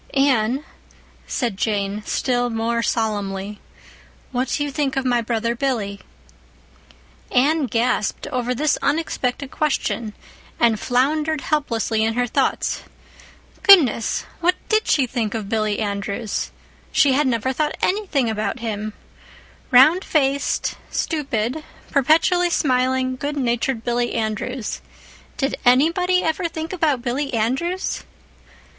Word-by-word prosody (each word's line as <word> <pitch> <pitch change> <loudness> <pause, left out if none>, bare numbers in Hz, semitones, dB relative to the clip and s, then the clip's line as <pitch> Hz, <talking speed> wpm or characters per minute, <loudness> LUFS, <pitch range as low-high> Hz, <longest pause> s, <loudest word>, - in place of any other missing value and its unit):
"Anne," 270 0 +2 0.6
said 235 -5 -1
Jane, 205 -1 -1
still 245 -1 0
more 230 +1 -1
solemnly, 205 -3 -2 0.7
"what 255 +1 -1
do 290 - 0
you 290 - -3
think 275 -2 -1
of 265 - 0
my 245 -2 +2
brother 230 0 -1
Billy?" 230 -6 -2 1.3
Anne 285 +3 +3
gasped 230 -1 0
over 250 0 -1
this 300 +4 +1
unexpected 280 -4 -1
question, 235 -7 -1 0.5
and 230 -3 +3
floundered 300 +6 +1
helplessly 230 -7 0
in 225 0 0
her 245 0 +1
thoughts. 240 - 0 0.8
Goodness, 295 - +5
what 360 +2 +3
did 435 0 +2
she 280 -4 +3
think 230 -3 -2
of 215 -3 -4
Billy 215 -2 0
Andrews? 200 +1 -3 0.4
She 290 -4 +4
had 290 +1 +2
never 255 +1 0
thought 300 +3 -1
anything 365 - +1
about 215 -1 -2
him—round 240 - 0
faced, 280 -2 0
stupid, 275 -2 -2 0.3
perpetually 330 +5 +3
smiling, 255 -3 +1
good 290 +2 -3
natured 240 -2 0
Billy 240 0 -1
Andrews. 220 +2 -3 0.6
Did 275 0 -1
anybody 340 +9 +3
ever 325 +2 0
think 320 +1 -5
about 300 -8 +1
Billy 270 +3 -2
Andrews? 270 +12 -1
255 Hz, 115 wpm, -21 LUFS, 225-295 Hz, 1.3 s, Goodness